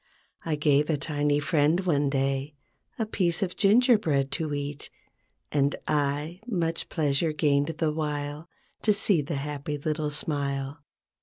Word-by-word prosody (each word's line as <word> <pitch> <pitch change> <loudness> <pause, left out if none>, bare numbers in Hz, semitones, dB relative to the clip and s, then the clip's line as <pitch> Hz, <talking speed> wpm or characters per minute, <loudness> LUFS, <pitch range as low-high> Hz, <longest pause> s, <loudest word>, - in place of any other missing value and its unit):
I 160 -2 -1
gave 150 0 +2
a 155 - +2
tiny 145 0 0
friend, 155 +3 +2
one 145 -6 +1
day, 135 +1 -1 0.4
A 225 - 0
piece 180 -5 +1
of 180 -1 -3
gingerbread 205 - +3
to 160 -3 -2
eat, 145 0 -4 0.6
And 140 0 +2
1, 150 +3 -1
much 170 -7 -1
pleasure 155 +1 +1
gained 145 0 +1
the 155 -2 0
while 150 +1 -4 0.3
To 215 - +3
see 200 -5 +3
the 145 +2 -4
happy 145 +1 -4
little 150 +1 -2
smile. 140 -1 -2
150 Hz, 140 wpm, -27 LUFS, 145-165 Hz, 0.6 s, gingerbread